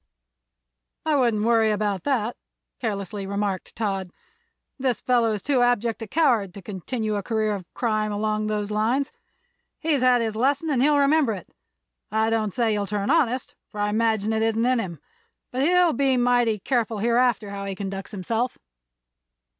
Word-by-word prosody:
"I 310 -1 +2
wouldn't 235 -6 +2
worry 225 -1 +4
about 205 -3 -1
that," 245 -5 0 0.4
carelessly 200 -3 -3
remarked 200 -1 -3
Todd. 195 -4 -2 0.7
"This 255 -3 0
fellow 240 -3 +2
is 205 - -4
too 270 -4 +2
abject 240 -2 +1
a 225 - -5
coward 230 - +2
to 200 - -8
continue 215 +3 -3
a - - -2
career 215 0 0
of 190 -4 -7
crime 215 -3 0
along 215 +1 -1
those 210 -1 -2
lines. 235 +7 +1 0.7
He's 305 -4 0
had 250 -2 +4
his 220 -1 -2
lesson, 280 +6 +1
and 255 -4 +2
he'll 290 +2 +4
remember 280 -3 +3
it. 190 - -9 0.6
I 220 +1 +1
don't 220 -2 0
say 230 -2 +2
he'll 205 -1 -1
turn 205 +3 -1
honest, 260 -6 +1
for 210 - -9
I 205 0 +1
imagine 220 0 +1
it 220 - 0
isn't 225 +1 +1
in 255 -1 +3
him; 175 -7 -5 0.5
but 255 - -2
he'll 355 +2 +4
be 265 0 +2
mighty 245 -2 +3
careful 230 +1 -1
hereafter 235 -1 +1
how 200 0 -5
he 195 -1 -4
conducts 195 0 -5
himself." 225 +5 -2
225 Hz, 170 wpm, -24 LUFS, 210-250 Hz, 0.7 s, worry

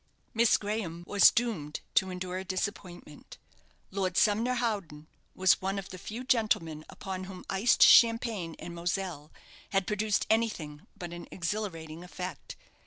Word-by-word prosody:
Miss 230 +1 +4
Graham 200 -5 -4
was 200 +1 +7
doomed 195 -12 -2
to 190 - +3
endure 185 0 -4
a - - -5
disappointment. 185 -4 -5 0.5
Lord 190 -2 -1
Sumner 225 +4 +3
Howden 200 -11 -2 0.3
was 185 +1 +4
one 195 +1 -1
of 195 -1 -5
the 185 - -9
few 225 +7 -6
gentleman 215 -11 +1
upon 185 -1 -6
whom 185 -1 -10
iced 195 +5 +4
champagne 230 -8 +5
and 175 - -8
moselle 170 -3 -3 0.4
had 195 -1 +1
produced 210 +1 0
anything 180 -10 -1
but 175 -1 -7
an 175 - -8
exhilarating 170 -4 -4
effect. 180 -3 -7
190 Hz, 140 wpm, -30 LUFS, 170-215 Hz, 0.5 s, was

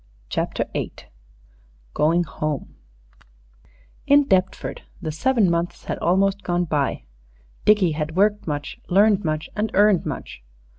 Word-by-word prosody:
CHAPTER - - -1
VIII - - -3 1.0
GOING 165 +3 +2
HOME 155 -3 -4 1.3
IN 290 +1 +6
Deptford 190 -8 0 0.2
the 160 -4 -4
seven 225 - +2
months 170 0 -2
had - - -3
almost 195 +3 +2
gone 175 -1 0
by; 145 - -1 0.6
Dickie 205 -5 +4
had 155 +1 -3
worked 205 +1 +2
much, 145 -1 -4
learned 205 +2 +4
much, 155 -1 -2
and 215 +1 -1
earned 205 -2 +4
much. - - -6
180 Hz, 120 wpm, -23 LUFS, 155-205 Hz, 1.3 s, IN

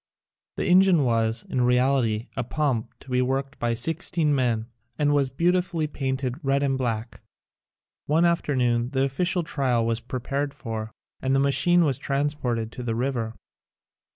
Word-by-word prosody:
The - - -2
engine 180 -3 +5
was, 115 -2 0
in 125 - -1
reality, 125 -3 +2
a - - -1
pump 130 -3 -1
to - - -15
be 125 0 +2
worked 135 +2 -2
by 120 0 0
sixteen 160 +3 0
men 120 -5 +1 0.3
and 145 -1 +2
was 140 -2 +2
beautifully 175 +3 +1
painted 135 -1 -3
red 140 +1 +1
and 135 -1 +1
black. 115 -4 -3 0.9
One 160 +4 +3
afternoon 125 -8 +1
the 135 0 +2
official 175 +6 0
trial 130 -6 0
was 115 0 0
prepared 135 +4 -3
for 115 -5 -5 0.3
and 130 +1 +1
the - - +3
ma 140 0 +3
chine 175 +4 +4
was 135 -4 0
transported 135 -5 -1
to 125 - -7
the 115 -2 -2
river. 120 -2 -2
135 Hz, 155 wpm, -25 LUFS, 120-145 Hz, 0.9 s, engine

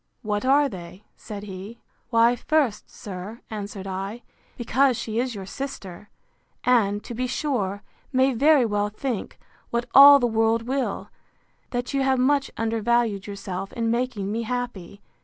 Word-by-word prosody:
What 210 +1 -1
are 280 +2 +4
they? 185 -3 -10
said 205 -1 -8
he. 200 +3 -8 0.3
Why, 235 0 +4
first, 270 -4 0
sir, 200 +3 -8
answered 205 -2 -6
I, 195 +5 -5 0.3
because 255 +1 +2
she 220 0 -3
is 250 -1 -1
your 195 -2 -6
sister; 205 -6 -7 0.5
and, 210 -5 +2
to - - -7
be 250 +2 -2
sure, 220 -8 -2 0.3
may 260 0 +3
very 280 +1 +4
well 205 -1 0
think, 230 +1 -4 0.3
what 235 0 -1
all 280 +1 +10
the 255 - +1
world 225 0 +2
will, 260 +2 -3 0.6
that 245 +2 -3
you 275 - +1
have 265 -1 +2
much 275 +2 +2
undervalued 225 -2 0
yourself 195 -1 -5
in 230 -1 -1
making 235 -5 -1
me 225 +2 -1
happy. 225 -5 -5
230 Hz, 150 wpm, -24 LUFS, 205-255 Hz, 0.6 s, all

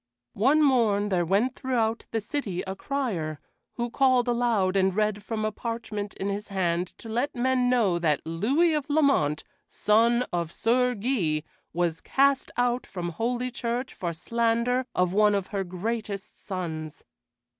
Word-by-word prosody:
One 280 +9 +4
morn 220 -7 +3
there 175 -3 +1
went 210 +8 +2
throughout 230 -4 -1
the 225 - -1
city 210 -6 -3
a 190 0 -5
crier, 195 - -3 0.3
who 240 -1 -3
called 255 -1 +3
aloud 235 -6 +1
and 190 -1 +2
read 210 -1 +1
from 215 +1 -3
a 215 - 0
parchment 215 -2 -5
in 195 - -3
his 200 +1 -3
hand 180 -3 0
to - - -11
let 240 +6 -1
men 250 0 +2
know 215 -9 +2
that 155 -4 +1
Louis 255 - +2
of 300 -1 -2
Lamont, 275 - +2 0.3
son 230 +3 +3
of 170 -2 -1
Sir 250 +5 +2
Guy, 195 - 0 0.3
was 170 -1 -1
cast 275 0 +2
out 245 0 +1
from 175 -2 -4
Holy 240 +8 -2
Church 245 +1 -3
for 175 -2 -3
slander 235 +7 0
of 180 0 +2
one 210 0 +4
of 195 -2 -2
her 195 -1 0
greatest 200 +2 -5
sons. 160 -5 -5
220 Hz, 155 wpm, -26 LUFS, 185-245 Hz, 0.3 s, One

